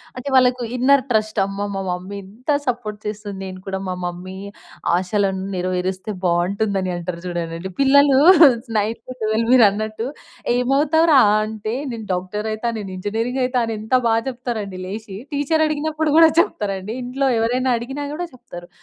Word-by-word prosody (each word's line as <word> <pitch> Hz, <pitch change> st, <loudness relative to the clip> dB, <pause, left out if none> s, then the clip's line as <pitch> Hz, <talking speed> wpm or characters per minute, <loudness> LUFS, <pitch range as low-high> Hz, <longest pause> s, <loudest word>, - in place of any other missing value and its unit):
అంటే, 255 Hz, +2 st, -7 dB
వాళ్ళకు 250 Hz, -1 st, +4 dB
inner 265 Hz, +2 st, +4 dB
trust. 215 Hz, -2 st, 0 dB
అమ్మా! 200 Hz, +1 st, -4 dB
మా 195 Hz, -, -3 dB
మమ్మీ 180 Hz, +3 st, -4 dB
ఇంత 225 Hz, +9 st, -13 dB, 0.2 s
సపోర్ట్ 230 Hz, -4 st, -3 dB
చేస్తుంది. 210 Hz, -1 st, -5 dB
నేను 185 Hz, 0 st, -7 dB
కూడా 190 Hz, 0 st, -3 dB
మా 185 Hz, -, -2 dB
మమ్మీ 180 Hz, +2 st, -6 dB, 0.6 s
ఆశలను 190 Hz, +1 st, 0 dB
నెరవేరిస్తే 185 Hz, +2 st, -2 dB
బావుంటుందని 185 Hz, +2 st, 0 dB
అంటారు 175 Hz, 0 st, -5 dB
జూడండండి. 170 Hz, 0 st, -4 dB
పిల్లలూ 275 Hz, 0 st, +5 dB, 0.6 s
9-12 220 Hz, +1 st, -2 dB
మీరన్నట్టు 215 Hz, -1 st, +3 dB, 0.5 s
ఏమవుతావురా 285 Hz, +4 st, +4 dB, 0.3 s
అంటే, 215 Hz, 0 st, -5 dB, 0.2 s
నేను 225 Hz, -2 st, -6 dB
డాక్టరయితా, 210 Hz, +5 st, -3 dB
నేనింజినీరింగయితా 225 Hz, +6 st, -2 dB
అని 225 Hz, -1 st, -3 dB
ఎంత 220 Hz, +4 st, -6 dB
బా 225 Hz, -, +3 dB, 0.2 s
చెప్తారండి 230 Hz, -7 st, -5 dB
లేసి. 200 Hz, 0 st, -7 dB, 0.2 s
టీచరడిగినప్పుడు 305 Hz, +1 st, 0 dB
గూడా 325 Hz, -1 st, +8 dB
చెప్తారండి. 205 Hz, -, -1 dB
ఇంట్లో 265 Hz, +3 st, -1 dB
ఎవరైనా 250 Hz, +3 st, +1 dB
అడిగినా 270 Hz, +5 st, -5 dB
గూడా 350 Hz, +3 st, -4 dB
జెప్తారు. 175 Hz, -8 st, -11 dB
215 Hz, 125 wpm, -21 LUFS, 190-255 Hz, 0.6 s, గూడా